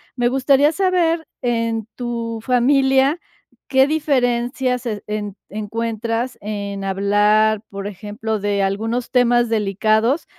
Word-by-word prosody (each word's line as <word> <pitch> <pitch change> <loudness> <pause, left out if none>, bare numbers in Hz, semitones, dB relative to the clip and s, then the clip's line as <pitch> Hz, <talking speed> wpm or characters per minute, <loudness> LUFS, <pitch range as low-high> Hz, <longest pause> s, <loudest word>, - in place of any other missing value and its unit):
Me 240 -1 +1
gustaría 275 +3 +3
saber, 340 -3 +1
en 230 -3 -1
tu 230 -2 -4
familia, 265 +4 +3 0.5
¿qué 265 0 +4
diferencias 255 -4 0
e 215 -3 -4
en 210 -2 -4
encuentras 230 +3 -3
en 200 -1 -5
hablar, 205 +2 +2
por 200 0 -6
ejemplo, 210 +2 -4
de 200 0 0
algunos 225 +6 -2
temas 240 -1 +3
delicados 220 - +1
230 Hz, 110 wpm, -20 LUFS, 210-255 Hz, 0.5 s, qué